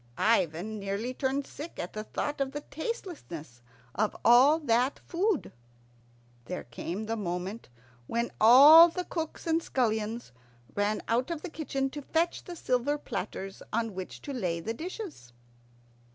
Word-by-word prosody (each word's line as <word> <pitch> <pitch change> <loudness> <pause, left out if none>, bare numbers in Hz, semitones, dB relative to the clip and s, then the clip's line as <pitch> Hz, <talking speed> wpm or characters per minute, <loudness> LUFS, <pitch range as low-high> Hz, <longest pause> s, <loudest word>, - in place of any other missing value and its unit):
Ivan 210 0 +1
nearly 200 +5 -3
turned 270 +1 -1
sick 305 +5 -9
at 175 - -5
the 215 - -4
thought 290 +6 -3
of 270 0 -1
the 295 - -4
tastelessness 290 - -6 0.3
of 215 - 0
all 260 +6 +7
that 250 0 +2
food. 370 0 -1 0.9
There - - -5
came 170 - -5
the 225 +1 -2
moment 185 - -4 0.4
when 235 +1 -1
all 285 +9 +10
the 360 +2 -3
cooks 320 -2 -5
and 325 0 +2
scullions 225 - -1 0.4
ran 205 +1 0
out 245 +5 +1
of 335 -3 -4
the 365 - -6
kitchen 270 -4 -2
to 295 - -6
fetch 330 +4 -1
the 350 - -7
silver 255 0 0
platters 195 -8 -5
on 225 -1 -1
which 185 0 -7
to 285 - -5
lay 180 -9 -1
the 220 +7 -3
dishes. 330 - -7
245 Hz, 150 wpm, -29 LUFS, 210-300 Hz, 0.9 s, all